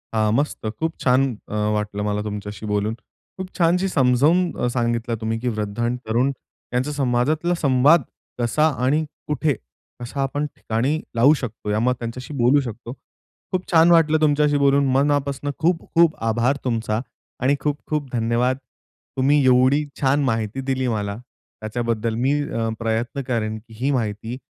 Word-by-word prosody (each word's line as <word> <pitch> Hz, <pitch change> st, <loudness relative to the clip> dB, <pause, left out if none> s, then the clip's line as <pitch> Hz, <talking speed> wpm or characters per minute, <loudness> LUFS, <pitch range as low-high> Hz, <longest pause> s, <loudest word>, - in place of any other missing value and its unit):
हां, 110 Hz, -1 st, +2 dB
मस्त. 140 Hz, -3 st, -1 dB
खूप 160 Hz, 0 st, -1 dB
छान 130 Hz, +1 st, +3 dB, 0.5 s
वाटलं 105 Hz, -1 st, -2 dB
मला 105 Hz, 0 st, -1 dB
अ, -, -, -3 dB
तुमच्याशी 105 Hz, 0 st, -6 dB
बोलून. 105 Hz, +1 st, 0 dB, 0.4 s
खूप 185 Hz, 0 st, -7 dB
छानशी 180 Hz, +2 st, +3 dB
समजावून 140 Hz, +2 st, +3 dB, 0.2 s
अ, -, -, 0 dB
सांगितलं 120 Hz, -1 st, -1 dB
तुम्ही 110 Hz, +1 st, -2 dB
की 125 Hz, -, -4 dB
वृद्ध 105 Hz, -2 st, -3 dB
आणि 120 Hz, +1 st, 0 dB
तरुण 120 Hz, +5 st, +2 dB, 0.4 s
यांचा 130 Hz, +4 st, 0 dB
समाजातला 145 Hz, +5 st, +1 dB
संवाद 140 Hz, +3 st, +5 dB, 0.4 s
कसा 120 Hz, +6 st, +2 dB, 0.2 s
आणि 150 Hz, +4 st, +2 dB, 0.2 s
कुठे, 150 Hz, 0 st, +1 dB, 0.5 s
कसा 125 Hz, +3 st, -4 dB
आपण 145 Hz, +2 st, -1 dB
ठिकाणी 130 Hz, +8 st, -1 dB, 0.2 s
लावू 130 Hz, +6 st, +6 dB
शकतो, 115 Hz, -7 st, -5 dB
या 105 Hz, +1 st, +1 dB
मग 125 Hz, +3 st, +2 dB
त्यांच्याशी 120 Hz, +4 st, -6 dB
बोलू 125 Hz, +4 st, +4 dB
शकतो. 120 Hz, -1 st, -7 dB, 0.6 s
खूप 185 Hz, -1 st, -3 dB
छान 165 Hz, 0 st, +6 dB
वाटलं 160 Hz, -2 st, +4 dB
तुमच्याशी 150 Hz, -1 st, +3 dB
बोलून 140 Hz, 0 st, +3 dB
मनापासून 140 Hz, +1 st, +1 dB
खूप 165 Hz, +1 st, +2 dB
खूप 165 Hz, -1 st, +4 dB
आभार 115 Hz, +4 st, +1 dB
तुमचा 115 Hz, -3 st, -1 dB, 0.4 s
आणि 135 Hz, +2 st, +3 dB
खूप 145 Hz, +1 st, -1 dB
खूप 150 Hz, -3 st, -2 dB
धन्यवाद. 120 Hz, +2 st, +1 dB, 0.6 s
तुम्ही 140 Hz, +2 st, +3 dB
एवढी 130 Hz, +3 st, +4 dB, 0.2 s
छान 140 Hz, +1 st, +2 dB
माहिती 115 Hz, 0 st, -1 dB
दिली 130 Hz, -1 st, 0 dB
मला, 105 Hz, -3 st, -2 dB, 0.4 s
त्याच्याबद्दल 115 Hz, 0 st, -2 dB
मी 135 Hz, +5 st, +1 dB
अ, 115 Hz, -7 st, -2 dB
प्रयत्न 115 Hz, +4 st, -2 dB
करेन 110 Hz, -3 st, -1 dB
की 110 Hz, +1 st, -16 dB
ही 135 Hz, +3 st, +1 dB
माहिती, 110 Hz, -1 st, -2 dB
125 Hz, 155 wpm, -22 LUFS, 115-145 Hz, 0.6 s, लावू